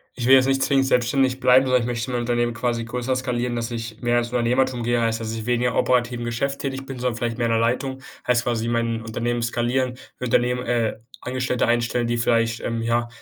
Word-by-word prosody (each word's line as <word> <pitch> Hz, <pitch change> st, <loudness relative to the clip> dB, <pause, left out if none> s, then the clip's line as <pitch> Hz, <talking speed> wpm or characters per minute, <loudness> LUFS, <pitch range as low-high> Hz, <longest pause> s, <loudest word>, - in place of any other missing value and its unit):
Ich 120 Hz, -2 st, -2 dB
will 135 Hz, -, +8 dB
jetzt 130 Hz, -1 st, +5 dB
nicht 135 Hz, 0 st, +1 dB
zwingend 135 Hz, 0 st, +3 dB
selbstständig 130 Hz, +1 st, +2 dB
bleiben, 130 Hz, +1 st, +5 dB
sondern 130 Hz, -1 st, +3 dB
ich 115 Hz, -, -3 dB
möchte 120 Hz, 0 st, -3 dB
mein 120 Hz, -, -1 dB
Unternehmen 120 Hz, 0 st, 0 dB
quasi 115 Hz, -1 st, -2 dB
größer 125 Hz, +2 st, -2 dB
skalieren, 125 Hz, -2 st, -2 dB
dass 115 Hz, 0 st, -3 dB
ich 115 Hz, -1 st, -6 dB
mehr 120 Hz, 0 st, +2 dB
ins 120 Hz, -, -2 dB
Unternehmertum 125 Hz, +1 st, +1 dB
gehe. 120 Hz, 0 st, +1 dB
Heißt, 115 Hz, -1 st, 0 dB
dass 110 Hz, -1 st, -4 dB
ich 110 Hz, 0 st, -5 dB
weniger 125 Hz, 0 st, +1 dB
operativ 125 Hz, -1 st, +1 dB
im 120 Hz, -, -4 dB
Geschäft 135 Hz, +4 st, -2 dB
tätig 135 Hz, -1 st, -4 dB
bin, 135 Hz, -2 st, -7 dB
sondern 125 Hz, -2 st, -1 dB
vielleicht 120 Hz, 0 st, -3 dB
mehr 120 Hz, -, +1 dB
in 115 Hz, -, +1 dB
der 115 Hz, -, +2 dB
Leitung, 130 Hz, +3 st, -1 dB, 0.3 s
heißt 120 Hz, -1 st, +3 dB
quasi 115 Hz, -2 st, -1 dB
mein 115 Hz, -1 st, 0 dB
Unternehmen 120 Hz, +1 st, -2 dB
skalieren. 120 Hz, +2 st, 0 dB, 0.2 s
Im 125 Hz, -, -3 dB
Unternehmen, 125 Hz, +1 st, +1 dB
äh, 115 Hz, -3 st, 0 dB, 0.3 s
Angestellte 125 Hz, -1 st, 0 dB
einstellen, 120 Hz, 0 st, +1 dB
die 120 Hz, 0 st, 0 dB
vielleicht, 115 Hz, -1 st, +1 dB
ähm, 115 Hz, -1 st, -3 dB
ja, 120 Hz, +1 st, 0 dB
120 Hz, 225 wpm, -23 LUFS, 115-125 Hz, 0.3 s, will